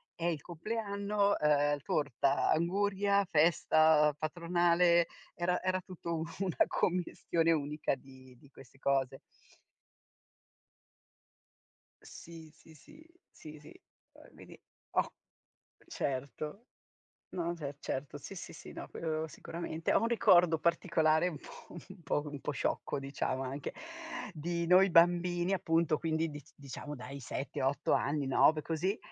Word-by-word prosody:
eh, 170 0 0
il 155 -3 -4
compleanno, 200 +2 -1
uhm, 145 -1 +3
torta, 140 -2 +1
anguria, 200 +4 +2
festa 155 -1 +4
patronale, 170 +1 +3 0.3
era 180 +1 0
era 185 0 0
tutto 170 -2 -5
un 160 - -2 0.2
una 185 -4 +2
commistione 170 -2 0
unica 150 -1 -1
di 130 -1 -16
di 140 - -19
queste 135 -1 -16
cose. 135 -1 0 2.8
Sì, 165 -1 -12
sì, 160 0 -18
sì. 300 - -17 0.3
Sì, 155 -1 -12
sì. 145 - -15 0.3
Poi - - -18
vedi, - - -14 0.3
ho - - 0 0.8
certo. 145 - -4 0.6
No, 170 -2 -2
se 145 -4 -6
certo, 140 +1 -4
sì, 145 - -9
sì, 185 - -8
sì, - - -11
no, - - -8
quello 160 -1 -3
sicuramente. 165 0 -4
Ho - - +5
un 230 - +2
ricordo 180 -8 +5
particolare 165 -1 +2
un 165 -4 -4
po' - - -13 0.2
un 190 -1 -12
po' 145 -1 0
un 145 -1 -7
po' 150 - -3
sciocco, 140 - -2
diciamo 135 -1 -3
anche, 135 +2 -5 0.6
di 170 +1 -3
noi 185 +3 +6
bambini 175 +1 +4
appunto, 165 -4 +2
quindi 160 0 -1
dic 150 -2 -10
diciamo 145 +1 -8
dai 140 +2 -8
7-8 135 +1 -2
anni, 145 -1 +1
9, 155 +3 +4
così, 175 +7 -1
160 Hz, 130 wpm, -32 LUFS, 145-175 Hz, 2.8 s, noi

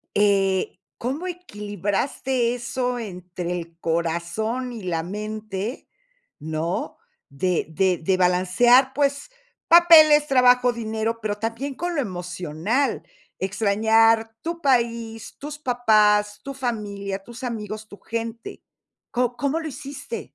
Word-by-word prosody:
Eh, 195 -2 +2 0.2
¿cómo 280 +10 -3
equilibraste 235 - -2
eso 245 +1 -2
entre 180 -4 -6
el 165 0 -10
corazón 170 +10 -2
y 220 - -8
la 165 -3 -1
mente?, 215 +3 -5 0.5
¿no? 160 +3 -3 0.3
De 170 +4 -1
de 180 +2 +1
de 185 +3 +1
balancear, 185 +9 +4
pues, 280 - 0 0.4
papeles, 315 -3 +8
trabajo, 250 -2 +5
dinero, 225 0 -2
pero 210 -1 -2
también 230 +6 -4
con 350 +3 -3
lo 285 - +1
emocional, 180 - -2 0.3
extrañar 220 +3 +3
tu 335 +1 -4
país, 235 -5 0
tus 295 +1 -7
papás, 215 -5 +3
tu 275 - -6
familia, 200 -6 -4
tus 235 +3 -11
amigos, 215 -3 -5
tu 205 - -13
gente. 230 0 -6 0.5
¿Co 245 -1 0
cómo 285 +3 0
lo 320 - -5
hiciste? 290 - -7
225 Hz, 115 wpm, -23 LUFS, 195-255 Hz, 0.5 s, papeles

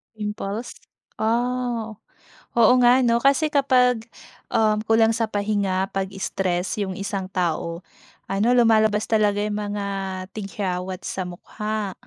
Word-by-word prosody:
Pimples 210 +1 -5 0.4
Ah. 235 0 -1 0.6
Oo 235 +1 +7
nga 245 +2 +6
ano, 235 0 +2
kasi 280 +3 +3
kapag, 250 -4 +3 0.5
uhm, 215 -1 +2
kulang 225 0 +4
sa 225 -1 -1
pahinga, 200 -2 0
'pag-stress 195 0 -2
yung 190 -2 -3
isang 195 -1 -4
tao, 170 -1 -2 0.4
ano, 195 +3 +1
lumalabas 220 -2 +4
talaga 210 -2 +2
yung 210 0 -2
mga 205 -1 -3 0.5
tigyawat 190 -3 -4
sa 185 - -3
mukha. 210 +2 -4
210 Hz, 115 wpm, -23 LUFS, 195-230 Hz, 0.6 s, Oo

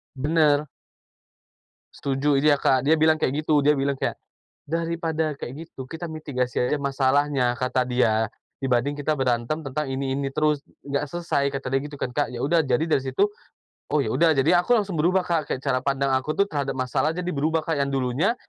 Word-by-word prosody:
Benar. 150 +1 +2 1.3
Setuju, 140 +1 0
dia, 145 -1 +4
Kak. 130 -2 +2
Dia 155 +4 +3
bilang 155 0 +3
kayak 150 +4 0
gitu. 150 -2 +3
Dia 150 +1 +3
bilang 140 +1 +1
kayak, 135 - -3 0.5
"Daripada 165 -1 -2
kayak 140 +4 -8
gitu, 130 -5 -10
kita 165 +1 -5
mitigasi 145 -7 -2
aja 145 +4 0
masalahnya,” 135 -2 +1
kata 130 0 +1
dia, 110 -3 +1 0.3
"dibanding 130 +2 +1
kita 145 +1 -1
berantem 125 +2 0
tentang 135 +1 -3
ini-ini 135 +1 -2
terus, 150 0 +1 0.2
nggak 140 0 -1
selesai." 165 -5 0
Kata 135 -1 -5
dia 135 +1 0
gitu 145 -1 -8
kan, 125 - -4
Kak. 145 - 0
Ya 125 - -6
sudah, 160 +6 +2
jadi 135 +3 +1
dari 155 -4 +1
situ, 135 +9 +1 0.7
oh, 150 - +4
ya 110 - -2
udah. 160 +5 +3
Jadi, 135 +4 +2
aku 240 +8 +3
langsung 200 -7 0
berubah, 180 +4 +3
Kak. 165 -4 -1
Kayak 130 - -6
cara 130 -3 +1
pandang 135 +1 0
aku 150 +4 -3
tuh 200 0 +1
terhadap 140 -3 -2
masalah 130 +4 0
jadi 180 +1 -3
berubah, 155 +1 0
Kak. 160 -2 -2
Yang 140 0 0
dulunya, 135 - +1
145 Hz, 190 wpm, -24 LUFS, 130-155 Hz, 1.3 s, dia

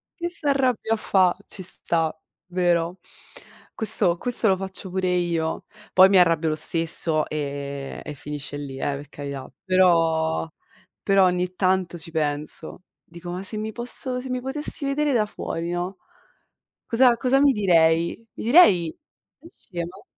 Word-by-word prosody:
che 345 -1 -4
s'arrabbia 270 -9 0
a - - +2
fa." 185 -4 +2
Ci 190 - -9
sta, 165 -2 -2 0.3
vero? 175 -1 -1 0.8
Questo 205 -5 +4
questo 245 0 +1
lo 190 -2 +2
faccio 190 0 -7
pure 185 -1 -1
io. 170 -3 -2 0.3
Poi, 190 +1 +7
mi 195 - +4
arrabbio 165 -2 +2
lo 155 - -1
stesso, 160 -1 +4
ehm, 140 -2 -6
e 150 - -7
finisce 145 0 -7
lì, 140 -2 -8
eh, 140 +1 -2
per 145 0 -10
carità. 140 -2 -8
Però, 165 -4 +2 0.6
però, 195 -1 +3
ogni 180 0 -1
tanto, 185 -2 0
ci 165 0 -10
penso. 155 +2 -3 0.2
Dico: 175 0 -10
“Ma 180 +2 -6
se 215 +2 -1
mi 215 +1 -4
posso, 250 +1 +3
se 260 - -8
mi 255 0 -3
potessi 280 +2 +1
vedere 285 0 0
da 220 -3 +2
fuori, 170 -4 -6
no?” 175 +1 -3 1.0
Cosa, 245 +1 +4
cosa 255 +3 +1
mi 280 -1 +4
direi? 170 +1 +1
Mi - - -9
direi: 210 - +4 0.5
"sei 335 - -16
scema?" 175 +2 -8
180 Hz, 150 wpm, -23 LUFS, 160-220 Hz, 1.0 s, Poi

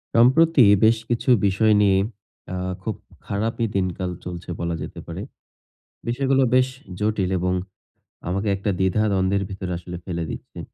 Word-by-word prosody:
সম্প্রতি 130 +4 +6 0.2
বেশ 115 +1 +5
কিছু 120 +2 -1 0.2
বিষয় 105 +3 +3
নিয়ে, 100 -2 +4 0.5
অ্যা 90 - -3 0.3
খুব 110 -1 -2 0.3
খারাপই 115 +3 -1
দিনকাল 95 -1 -1 0.2
চলছে 90 0 -7
বলা 85 0 -1
যেতে - - -7
পারে। - - -6 0.9
বিষয়গুলো 135 +2 +2
বেশ 130 0 +4 0.3
জটিল 105 -3 0
এবং 90 +1 0 0.8
আমাকে 95 +4 -1
একটা 100 +2 -3
দ্বিধা 95 +3 +2
দ্বন্দ্বের 95 +1 +1
ভিতরে 95 -1 -5
আসলে 90 +1 -7
ফেলে 85 -3 -3
দিচ্ছে। - - -8
100 Hz, 140 wpm, -23 LUFS, 90-115 Hz, 0.9 s, সম্প্রতি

